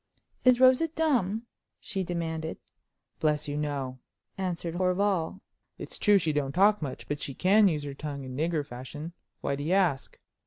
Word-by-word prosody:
"Is 255 -1 +5
Rosa 260 +5 +6
dumb?" 245 - 0 0.3
she 190 -2 -3
demanded. 165 -2 -3 0.6
"Bless 150 -1 +1
you, 145 - -3
no!" 140 -4 -3 0.4
answered 175 -3 -3
Horval. 185 0 0 0.4
"It's - - -8
true 210 - +5
as 195 - +4
she 155 - +1
don't 140 -2 -1
talk 205 +3 +4
much, 140 -4 -5
but 145 0 -3
she 135 - -5
can 200 +6 +5
use 155 -5 0
her 140 -1 -5
tongue 140 -1 -6
in 130 -1 -7
nigger 155 0 0
fashion. 145 +5 -8 0.3
Why 140 - -1
do 140 - -6
you 160 +5 0
ask?" 180 -9 +1
165 Hz, 170 wpm, -28 LUFS, 145-195 Hz, 0.6 s, Rosa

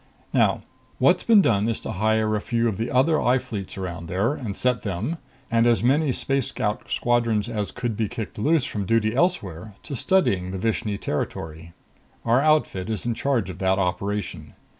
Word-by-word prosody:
"Now, - - +2 0.3
what's - - +3
been 220 -4 +6
done 105 -3 +2
is 115 - -1
to - - -5
hire 110 +1 +1
a 105 - -1
few 120 0 0
of 105 -5 -1
the 115 +2 -1
other 150 +5 +3
I 125 +2 +3
Fleets 100 -7 -6
around 85 -3 -5
there 95 - 0
and 115 -9 -5
set 125 -2 +1
them 110 - -3 0.3
and 115 0 +4
as 120 -1 +3
many 140 +3 +3
Space 135 0 0
Scout 105 0 -3
squadrons 115 -3 +1
as 105 -5 -2
could 120 -3 -3
be 110 -1 -1
kicked 115 -3 -6
loose 150 +4 +2
from 100 -3 -4
duty 110 0 +2
elsewhere 110 - -1
to 140 - -4
surveying 100 - +1
the 95 - -4
Vishni 110 0 -1
territory. 80 +1 -4 0.5
Our 120 +3 +4
outfit 150 -11 +1
is 110 0 -3
in 120 - 0
charge 115 -7 0
of 90 - -11
that 95 0 +2
operation. 100 +2 -3
110 Hz, 185 wpm, -24 LUFS, 95-125 Hz, 0.5 s, been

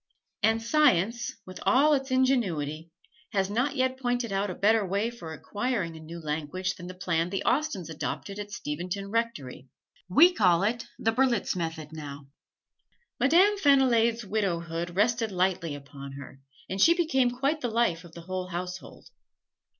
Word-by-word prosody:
And 225 +1 +2
science 235 - +2
with 185 0 -9
all 295 +4 +4
its 270 -1 0
ingenuity 180 - 0 0.4
has 195 -1 0
not 255 +6 0
yet 260 -1 0
pointed 245 -3 -1
out 195 +1 0
a 180 - -4
better 220 +1 +3
way 200 +5 -1
for 175 -9 -9
acquiring 205 0 -3
a - - -9
new 165 +2 -9
language 160 +4 -3
than 175 -1 -10
the 185 - -8
plan 175 -2 -1
the 195 0 -3
Austens 245 - 0
adopted 195 +5 -5
at 205 0 -6
Steventon 185 +3 -5
Rectory. 210 - -3 0.4
We 335 - +7
call 180 - +3
it 230 +3 -1
the 225 - +1
"Berlitz 240 -4 +1
Method" 160 -3 -4
now. 145 -3 -8 0.9
Madame 375 +9 +4
Fenillade's 240 - +3
widowhood 175 -4 -2
rested 225 +2 +1
lightly 180 -4 0
upon 140 -1 -10
her, 135 -1 -10 0.3
and 190 +1 -3
she 335 +8 +6
became 300 -8 +2
quite 275 +5 -1
the 245 - 0
life 220 -8 +1
of 170 -2 -14
the 170 - -9
whole 185 +1 -4
household. 180 +1 -7
200 Hz, 160 wpm, -28 LUFS, 170-245 Hz, 0.9 s, We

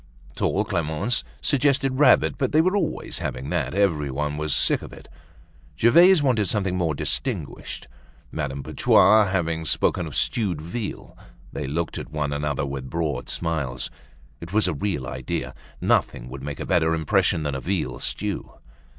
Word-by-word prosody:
Tall 105 +2 0
Clemence 85 - 0 0.2
suggested 135 -1 +1
rabbit, 145 -3 +5
but 130 0 0
they 155 - +5
were 185 +4 +3
always 205 - -1
having 70 - -4
that, - - -1
everyone 75 -7 0
was 75 0 -2
sick - - +3
of - - -9
it. - - -13 0.7
Gervaise 170 +7 +6
wanted 115 -7 +2
something 95 -3 0
more 85 -4 0
distinguished. - - -3 0.4
Madame 70 -3 -4
Putois 110 +8 +5
having 85 -4 -1
spoken - - +1
of - - -8
stewed 95 -9 0
veal, 95 +8 -6 0.4
they - - -4
looked 80 +4 -2
at - - -8
one 75 -2 -2
another 70 -1 -1
with 70 -2 -5
broad 75 -7 -2
smiles. 70 -7 -2 0.5
It 85 +2 -9
was 110 +1 +2
a - - 0
real 75 -3 -2
idea, 65 -1 -4 0.3
nothing - - +1
would 65 +1 -8
make 70 0 -6
a - - -4
better 80 -2 +2
impression 80 0 +1
than 75 -1 -2
a 65 - -4
veal 80 -9 -2
stew. 90 +11 -3
80 Hz, 160 wpm, -24 LUFS, 70-105 Hz, 0.7 s, Gervaise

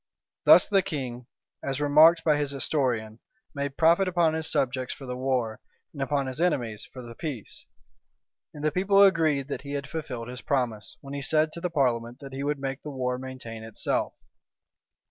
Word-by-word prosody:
Thus - - +8
the 195 -2 +4
king, 130 -9 -5 0.3
as 135 0 -3
remarked 155 +3 +6
by 155 -2 +4
his 145 -1 -1
historian, 125 -6 -1 0.3
made 140 -1 -4
profit 170 +4 +4
upon 170 -3 +2
his 160 0 -2
subjects 130 -1 -1
for 135 - -10
the 125 -1 -4
war, 125 -4 -1 0.3
and 140 - -7
upon 140 +1 0
his 130 +4 -5
enemies 120 -11 -1
for 125 - -9
the 120 -1 -9
peace.[*] 130 -5 -7 0.8
And 150 - -9
the 155 - +3
people 195 +4 +4
agreed 160 -8 +3
that - - -4
he 140 0 -7
had 140 -1 -3
fulfilled 135 -8 -5
his 125 0 -7
promise, 120 -6 -2
when 140 0 -9
he 140 - -3
said 155 +2 +2
to 170 - -7
the 180 - -1
parliament 120 -6 0
that 135 -2 -10
he 135 - -4
would 145 +1 0
make 135 0 -4
the 150 - -7
war 125 -2 -2
maintain 130 -4 -8
itself. 110 -1 -2
140 Hz, 185 wpm, -27 LUFS, 125-155 Hz, 0.8 s, Thus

